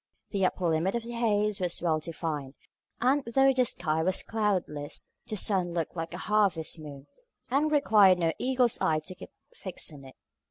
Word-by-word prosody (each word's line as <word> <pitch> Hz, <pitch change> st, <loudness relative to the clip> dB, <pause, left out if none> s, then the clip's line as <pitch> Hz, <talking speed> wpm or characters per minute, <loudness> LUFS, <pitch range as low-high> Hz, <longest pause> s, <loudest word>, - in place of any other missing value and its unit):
The 195 Hz, -3 st, +2 dB
upper 180 Hz, -, -4 dB
limit 165 Hz, +6 st, +1 dB
of 235 Hz, -, -2 dB
the 235 Hz, -, -7 dB
haze 210 Hz, -3 st, +1 dB
was 180 Hz, -2 st, 0 dB
well 160 Hz, -3 st, +1 dB
defined; 155 Hz, -4 st, -5 dB, 0.5 s
and 270 Hz, +4 st, +2 dB
though 270 Hz, +3 st, +3 dB
the 255 Hz, -1 st, +2 dB
sky 160 Hz, -7 st, 0 dB
was 185 Hz, +3 st, +1 dB
cloudless, 185 Hz, -10 st, -2 dB, 0.2 s
the 215 Hz, -, -4 dB
sun 185 Hz, -3 st, +1 dB
looked 165 Hz, 0 st, -2 dB
like 165 Hz, 0 st, -5 dB
a 180 Hz, -, -6 dB
harvest 195 Hz, -7 st, +1 dB
moon, 145 Hz, -3 st, -10 dB, 0.5 s
and 295 Hz, +4 st, +2 dB
required 210 Hz, -10 st, +5 dB
no 165 Hz, -2 st, +1 dB
eagle's 255 Hz, -2 st, +2 dB
eye 155 Hz, -1 st, +2 dB
to 185 Hz, -, -6 dB
keep 185 Hz, -, -12 dB, 0.2 s
fixed 180 Hz, -4 st, -3 dB
on 140 Hz, -2 st, -12 dB
it. 130 Hz, -, -13 dB
185 Hz, 185 wpm, -28 LUFS, 160-225 Hz, 0.5 s, required